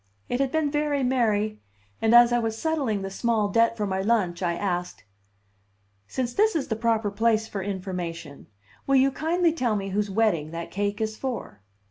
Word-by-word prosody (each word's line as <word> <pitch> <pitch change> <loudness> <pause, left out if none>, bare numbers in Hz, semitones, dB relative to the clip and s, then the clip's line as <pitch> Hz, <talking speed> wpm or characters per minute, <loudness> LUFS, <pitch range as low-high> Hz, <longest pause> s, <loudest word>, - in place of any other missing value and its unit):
It 245 - -1
had 275 -1 +1
been 315 -2 0
very 295 -2 0
merry; 215 -4 +1 0.4
and 225 +1 +4
as 240 0 +7
I 240 - +3
was 225 -1 -2
settling 270 -10 -1
the 195 - -5
small 220 0 0
debt 230 +2 +2
for 210 - -1
my 190 -1 -1
lunch 195 -5 0
I 170 -2 0
asked: 180 -2 -3 1.0
"Since 245 -2 -3
this 435 -1 +2
is 295 -4 -1
the 220 - 0
proper 225 -2 0
place 220 +1 +1
for 200 -3 -5
information, 180 -6 -5 0.4
will 275 - +3
you 270 +1 +4
kindly 330 +4 +1
tell 245 -9 0
me 195 -1 -3
whose 205 +1 -1
wedding 190 -7 +1
that 165 +1 -6
cake 205 +2 -2
is 220 0 -2
for?" 250 - -5
220 Hz, 185 wpm, -25 LUFS, 195-255 Hz, 1.0 s, as